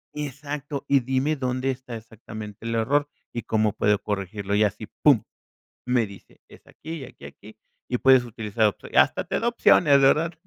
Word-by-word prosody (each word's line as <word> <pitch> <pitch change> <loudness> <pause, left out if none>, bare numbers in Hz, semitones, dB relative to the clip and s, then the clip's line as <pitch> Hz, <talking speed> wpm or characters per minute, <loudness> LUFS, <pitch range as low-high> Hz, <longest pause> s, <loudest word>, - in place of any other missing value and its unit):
exacto. 145 0 -5
Y 140 0 +4
dime 130 +4 0
dónde 130 -1 -1
está 125 -2 -8
exactamente 110 -1 -10
el 115 0 -2
error 145 +6 +1 0.2
y 120 - -3
cómo 110 -2 +1
puedo 105 0 +2
corregirlo. 100 0 -4
Y 105 - +4
así, 105 +1 -2
pum, 135 -8 +5 0.6
me 125 -2 +2
dice: 100 -1 -15
"Es - - -18
aquí 160 - -9
y - - -6
aquí, 120 - -14
aquí 105 +9 -14 0.3
y 125 - -1
puedes 130 -1 +5
utilizar 110 -1 -1
otro". 105 - -3
Hasta - - +4
te - - -2
da 230 - -2
opciones, 155 -11 +5
¿verdad? 155 +5 +3
120 Hz, 180 wpm, -24 LUFS, 110-140 Hz, 0.6 s, pum